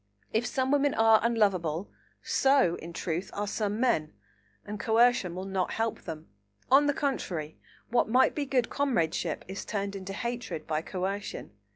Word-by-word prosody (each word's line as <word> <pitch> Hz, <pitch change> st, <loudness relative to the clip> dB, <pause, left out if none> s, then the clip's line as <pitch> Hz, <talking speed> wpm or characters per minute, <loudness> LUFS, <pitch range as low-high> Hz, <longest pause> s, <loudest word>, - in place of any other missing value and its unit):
If 225 Hz, +3 st, +1 dB
some 260 Hz, +3 st, 0 dB
women 285 Hz, -1 st, +3 dB
are 225 Hz, -1 st, +6 dB
unlovable, 195 Hz, -7 st, +1 dB, 0.3 s
so, 270 Hz, -10 st, +3 dB
in 170 Hz, -, -8 dB
truth, 170 Hz, +2 st, -3 dB
are 205 Hz, -, -2 dB
some 210 Hz, +1 st, -2 dB
men, 235 Hz, -12 st, +1 dB, 0.5 s
and 210 Hz, 0 st, -6 dB
coercion 225 Hz, -5 st, +3 dB
will 185 Hz, +1 st, -5 dB
not 190 Hz, -1 st, -1 dB
help 225 Hz, 0 st, -1 dB
them. 160 Hz, -2 st, -7 dB, 0.4 s
On 285 Hz, +2 st, +6 dB
the 290 Hz, -, +3 dB
contrary; 175 Hz, -, -3 dB, 0.3 s
what 240 Hz, -2 st, +2 dB
might 255 Hz, +3 st, +4 dB
be 290 Hz, -2 st, -2 dB
good 255 Hz, -3 st, +1 dB
comradeship 175 Hz, -, 0 dB
is 190 Hz, +2 st, -5 dB
turned 200 Hz, -2 st, -3 dB
into 195 Hz, 0 st, -6 dB
hatred 235 Hz, -6 st, -4 dB
by 155 Hz, -1 st, -1 dB
coercion. 190 Hz, -, -4 dB
210 Hz, 160 wpm, -29 LUFS, 180-245 Hz, 0.5 s, are